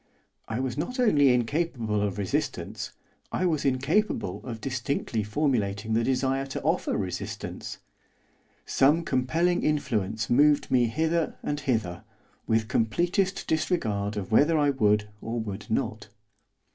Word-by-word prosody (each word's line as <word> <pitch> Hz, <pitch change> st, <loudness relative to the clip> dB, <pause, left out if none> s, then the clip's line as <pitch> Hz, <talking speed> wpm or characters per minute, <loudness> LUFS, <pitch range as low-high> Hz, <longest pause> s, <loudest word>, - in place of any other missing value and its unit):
I 110 Hz, +2 st, -3 dB
was 130 Hz, +1 st, -2 dB
not 250 Hz, -, -3 dB
only 145 Hz, -, +5 dB
incapable 120 Hz, -4 st, 0 dB
of 100 Hz, -2 st, -1 dB
resistance, 100 Hz, -3 st, -2 dB, 0.4 s
I 185 Hz, -, 0 dB
was 160 Hz, -5 st, +1 dB
incapable 130 Hz, -, 0 dB
of 115 Hz, -3 st, -6 dB
distinctly 125 Hz, -2 st, -2 dB
formulating 105 Hz, -3 st, 0 dB
the 115 Hz, +1 st, +2 dB
desire 135 Hz, +2 st, 0 dB
to 135 Hz, -, -5 dB
offer 165 Hz, +5 st, +1 dB
resistance. 95 Hz, -3 st, -5 dB, 0.9 s
Some 150 Hz, +5 st, +3 dB
compelling 165 Hz, +3 st, +1 dB
influence 110 Hz, -8 st, 0 dB
moved 145 Hz, +4 st, +4 dB
me 125 Hz, -2 st, +4 dB
hither 160 Hz, +6 st, 0 dB
and 145 Hz, 0 st, -2 dB
hither, 110 Hz, -11 st, -1 dB, 0.4 s
with 110 Hz, -1 st, +2 dB
completest 175 Hz, -, +1 dB
disregard 110 Hz, -, 0 dB
of 100 Hz, -1 st, -4 dB
whether 150 Hz, +8 st, +5 dB
I 145 Hz, -1 st, +3 dB
would 105 Hz, -5 st, +2 dB
or 115 Hz, +1 st, -3 dB
would 105 Hz, 0 st, -6 dB
not. 110 Hz, -1 st, -2 dB
130 Hz, 130 wpm, -27 LUFS, 110-150 Hz, 0.9 s, only